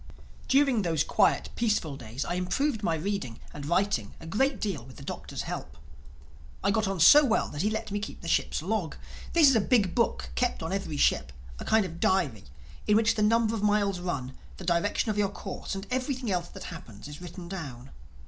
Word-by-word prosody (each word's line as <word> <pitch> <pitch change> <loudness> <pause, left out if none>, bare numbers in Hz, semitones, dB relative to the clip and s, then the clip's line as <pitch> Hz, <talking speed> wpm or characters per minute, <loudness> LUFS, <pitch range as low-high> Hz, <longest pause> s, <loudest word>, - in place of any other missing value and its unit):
During 270 -4 +4
those 165 -5 +1
quiet - - +2
peaceful 210 -11 0
days 120 +1 -5
I - - -2
improved 210 +8 0
my 165 -6 +1
reading 160 - -3
and 145 -1 -7
writing 170 - 0
a - - -11
great 265 - +1
deal 190 - -2
with 130 +1 -13
the - - -11
Doctor's - - -5
help. - - -6 0.9
I 200 - +3
got 215 0 +1
on 195 -2 -2
so 290 - +9
well 235 -5 +1
that 145 - -4
he 210 - +2
let 220 -2 -3
me 205 - -1
keep 205 - -7
the 170 - -7
ship's 165 - +1
log. 190 -4 -1 0.4
This 330 -3 +7
is 270 - +5
a 220 - +4
big 200 -5 +2
book 235 - 0
kept 245 -8 0
on 165 +3 -3
every 195 -6 -3
ship, 65 - +2 0.3
a - - -6
kind 220 -2 +3
of 170 -1 -7
diary, 150 - +1 0.4
in 210 - +5
which 225 0 +3
the 215 - -2
number 225 +1 +3
of 225 - -2
miles 205 -2 +2
run, 135 -8 -4 0.2
the - - -9
direction 180 +6 +1
of 210 - -2
your 200 -1 +2
course 195 -1 -6
and 195 +1 -5
everything 255 -2 -1
else 175 -2 -1
that - - -10
happens 115 - -9
is 150 +3 -9
written 175 0 -8
down. 140 -9 -7
195 Hz, 210 wpm, -28 LUFS, 160-220 Hz, 0.9 s, so